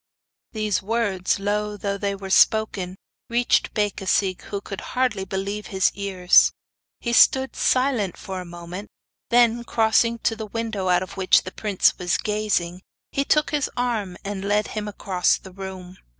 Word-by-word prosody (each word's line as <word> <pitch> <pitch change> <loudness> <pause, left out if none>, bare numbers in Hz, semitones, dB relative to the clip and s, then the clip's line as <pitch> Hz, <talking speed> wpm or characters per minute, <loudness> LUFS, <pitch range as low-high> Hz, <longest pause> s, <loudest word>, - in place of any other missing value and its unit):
These 215 -3 0
words, 205 -4 0
low 210 +1 -1
though 200 0 -2
they 200 -1 -1
were 195 -1 -7
spoken, 195 -4 +3 0.3
reached 240 +1 +1
Becasigue, 195 -3 0
who 200 - -4
could 195 -1 -7 0.2
hardly 235 -7 +1
believe 200 +2 -4
his 190 -1 +2
ears. 190 -2 +4 0.5
He 235 - -2
stood 265 +2 +5
silent 255 -8 +1
for 190 -2 -6
a - - -6
moment; 175 +3 -8 0.4
then, 235 -1 +4
crossing 230 0 +2
to 225 - +1
the 220 -1 -6
window 220 -3 -3
out 180 0 +3
of 185 - -10
which 185 -1 +4
the 185 - -7
prince 205 -3 +1
was 180 -3 +1
gazing, 205 -4 -1 0.3
he 275 - 0
took 300 +2 +2
his 295 -2 0
arm 220 -7 -2
and 200 -1 -4
led 205 +1 +1
him 215 -1 -4
across 190 -3 +1
the 190 - -13
room. 185 -1 -8
205 Hz, 160 wpm, -23 LUFS, 190-225 Hz, 0.5 s, stood